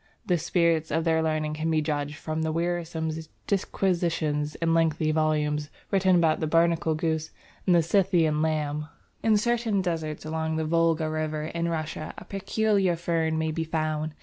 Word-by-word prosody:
The 180 -2 +1
spirit 165 -1 +1
of 160 +2 0
their 160 -1 +2
learning 155 -1 0
can 155 +1 -2
be 160 -1 +2
judged 150 -1 -2
from 155 +2 -4
the 160 0 0
wearisome 165 -1 -1 0.3
disquisitions 170 -6 0
and 165 0 0
lengthy 160 -1 +2
volumes 150 -1 0 0.2
written 190 -2 +4
about 165 -3 +3
the 155 - -1
Barnacle 165 0 +2
Goose 160 -1 -1 0.4
and 170 -3 +4
Scythian 170 -5 +2
Lamb. 150 -1 -1 0.3
In 220 -2 +4
certain 230 -1 +1
deserts 160 -5 -3
along 160 0 -2
the 160 0 -1
Volga 165 0 +2
River 155 -1 -2
in 170 +2 -2
Russia, 155 -1 -4
a - - -9
peculiar 195 -2 +1
fern 165 -1 0
may 160 0 0
be 165 +1 -2
found. 155 -1 -2
160 Hz, 160 wpm, -27 LUFS, 155-170 Hz, 0.4 s, written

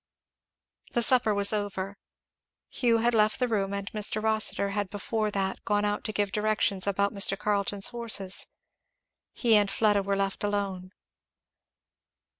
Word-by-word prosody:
The 240 - +3
supper 245 -2 +3
was 200 0 +2
over. 200 -1 -3 0.8
Hugh 235 -2 +2
had 240 - +2
left 215 -1 +2
the 250 - 0
room, 200 -4 -1
and 200 0 -4
Mr. 210 0 -1
Rossitur 215 -2 +2
had 205 -1 -3
before 215 +2 -3
that 195 -2 -3
gone 205 -1 0
out 205 0 -2
to 215 - -1
give 205 -1 -1
directions 210 -2 0
about 200 0 0
Mr. 195 -1 +3
Carleton's 205 -1 0
horses. 215 -5 +1 0.8
He 230 -3 +2
and 205 -1 +3
Fleda 205 0 +2
were 200 0 -1
left 195 0 -2
alone. 195 -3 -3
205 Hz, 145 wpm, -27 LUFS, 200-215 Hz, 0.8 s, The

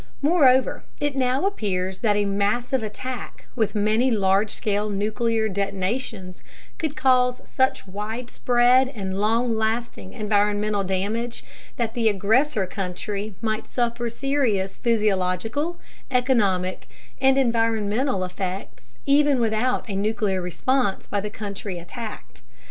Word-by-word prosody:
Moreover, 275 -5 +4 0.2
it 290 -1 -1
now 260 +4 +1
appears 190 - -1
that 210 -3 +2
a 205 0 +2
massive 210 +6 0
attack 245 +4 -6
with 220 -2 0
many 215 +5 +2
large 200 -2 +2
scale 210 0 -1
nuclear 220 +2 0
detonations 195 0 -3 0.4
could 310 -2 -2
cause 250 -2 +3
such 260 0 0
widespread 240 +5 +2
and 195 -2 -3
long 230 +2 +2
lasting 220 -2 -2
environmental 210 -1 +1
damage 205 +6 -2 0.3
that 230 -2 -1
the 230 -2 +2
aggressor 215 +3 +2
country 200 +2 -4
might 220 0 -1
suffer 240 -1 -1
serious 235 -7 0
physiological, 220 - 0 0.3
economic, 220 -8 +1 0.3
and 265 0 +5
environmental 225 -2 +1
effects 180 -10 -6
even 285 -1 +4
without 230 +3 +1
a 200 - -4
nuclear 205 -2 0
response 200 +4 0
by 205 - -2
the 210 - -4
country 200 -2 -5
attacked. 215 +6 -8
220 Hz, 115 wpm, -24 LUFS, 200-250 Hz, 0.4 s, and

